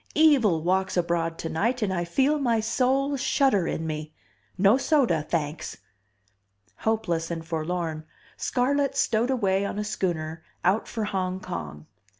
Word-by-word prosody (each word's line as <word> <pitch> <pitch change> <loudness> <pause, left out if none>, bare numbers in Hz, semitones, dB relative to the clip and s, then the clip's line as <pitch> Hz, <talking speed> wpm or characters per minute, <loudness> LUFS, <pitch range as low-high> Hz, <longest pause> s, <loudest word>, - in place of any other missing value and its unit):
Evil 255 - +4
walks 190 +2 +1
abroad 170 -1 0
tonight 215 +10 -1
and 195 -2 0
I 175 -1 -1
feel 275 - +2
my 235 -5 +2
soul 265 +5 +1
shudder 250 -8 +2
in 160 - -2
me. 155 -1 -5 0.4
No 195 +4 +5
soda, 265 - +2
thanks!" 150 - -3 1.0
Hopeless 175 -7 -1
and 165 -1 -4
forlorn, 160 -1 -3 0.3
Scarlett 275 +2 0
stowed 235 -1 +2
away 195 -7 +1
on 200 - -3
a 210 - -1
schooner 170 -6 -2 0.2
out 195 +5 +2
for 225 - -3
Hong 185 -2 -2
Kong. 75 - -6
190 Hz, 140 wpm, -26 LUFS, 165-245 Hz, 1.0 s, No